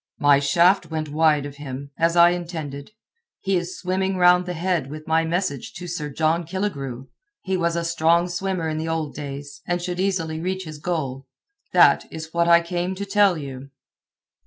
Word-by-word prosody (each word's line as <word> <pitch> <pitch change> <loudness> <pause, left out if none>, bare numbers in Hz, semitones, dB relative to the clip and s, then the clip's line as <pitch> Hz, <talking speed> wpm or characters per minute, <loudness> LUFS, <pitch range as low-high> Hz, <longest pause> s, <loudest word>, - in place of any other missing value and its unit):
My 145 -1 +5
shaft 170 +7 +3
went 155 -2 -3
wide 150 -1 +2
of 145 0 -8
him, 140 -1 -7
as 165 +1 +1
I 170 0 +7
intended. 160 -5 -5 0.5
He 195 -1 0
is 175 0 -3
swimming 190 +1 -1
round 180 0 +5
the 180 - -3
head 170 -5 -1
with 155 +1 -8
my 160 0 +2
message 185 +6 -2
to 180 -2 -8
Sir 155 -3 -4
John 160 +4 +1
Killigrew. 140 -9 -4 0.4
He 190 0 -1
was 170 -2 0
a 170 0 -1
strong 170 +1 +2
swimmer 180 -1 -2
in 155 0 -2
the 160 - -3
old 160 -2 -2
days, 145 0 -7
and 175 0 0
should 175 0 -4
easily 175 -5 -1
reach 185 +2 -3
his 155 -3 -9
goal. 140 -5 -3 0.4
That - - +5
is 160 0 -8
what 170 0 +2
I 170 0 +7
came 175 +2 -3
to 200 +2 -4
tell 200 -3 +3
you." 135 -2 -8
170 Hz, 185 wpm, -23 LUFS, 150-180 Hz, 0.5 s, I